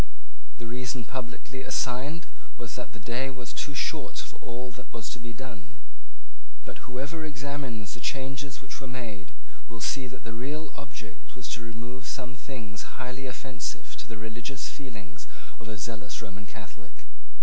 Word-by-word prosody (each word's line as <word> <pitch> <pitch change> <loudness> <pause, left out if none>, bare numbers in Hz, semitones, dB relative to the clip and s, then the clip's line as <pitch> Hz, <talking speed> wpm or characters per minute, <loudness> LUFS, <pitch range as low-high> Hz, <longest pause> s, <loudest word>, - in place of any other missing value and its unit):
The 120 - -2
reason 125 0 +2
publicly 130 +1 -1
assigned 135 +6 +4 0.3
was 120 -4 -2
that 125 - 0
the 115 - -6
day 120 +5 +4
was 125 -3 -2
too 145 - +2
short - - +4
for - - 0
all 125 +1 -1
that 125 +1 -7
was 110 -1 0
to 125 - -2
be 120 - -2
done. 110 -6 -5 0.9
But - - -5
whoever 140 +6 +1
examines 135 -7 +1
the 120 - -3
changes 135 0 +2
which 130 - -3
were 135 - -1
made 110 -8 -1 0.4
will 115 - -3
see 130 +3 +5
that 130 - -5
the 115 - 0
real 145 +7 +1
object 125 -6 -5
was 125 - -2
to 120 - +1
remove 120 +3 -2
some 130 -3 +1
things 120 -6 -2
highly 130 +1 +1
offensive 130 +1 0
to - - -5
the 115 - -1
religious 120 +5 0
feelings 105 - -4 0.3
of 115 - -4
a 110 - 0
zealous 100 -4 0
Roman 100 -2 -3
Catholic. 105 -4 -8
125 Hz, 165 wpm, -35 LUFS, 115-130 Hz, 0.9 s, see